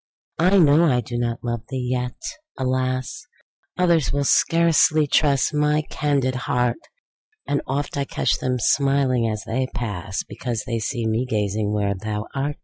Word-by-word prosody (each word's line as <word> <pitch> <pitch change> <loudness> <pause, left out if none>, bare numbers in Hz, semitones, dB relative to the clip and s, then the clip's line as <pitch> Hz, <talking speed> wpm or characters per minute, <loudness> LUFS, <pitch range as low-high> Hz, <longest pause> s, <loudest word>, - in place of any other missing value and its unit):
I 185 +4 +4
know 160 -1 +5
I 125 -6 +2
do 120 +1 -7
not 120 -1 -2
love 120 -1 -2
thee! 130 -2 -3
yet, 125 -1 -2 0.4
alas! 130 - -2 0.5
Others 170 -5 +2
will 145 0 0
scarcely 160 0 +4
trust 145 -1 +2
my 150 +1 +2
candid 140 -3 0
heart; 125 -1 0 0.7
And 145 - 0
oft 140 +2 -2
I 140 - 0
catch - - 0
them 125 0 -1
smiling 135 -2 +2
as 105 -2 -4
they 130 +5 -1
pass, 100 -5 -3
Because 120 -3 -4
they 115 -3 -2
see 120 +1 -3
me 110 +3 0
gazing 105 -2 -1
where 100 -1 0
130 Hz, 145 wpm, -22 LUFS, 120-145 Hz, 0.7 s, know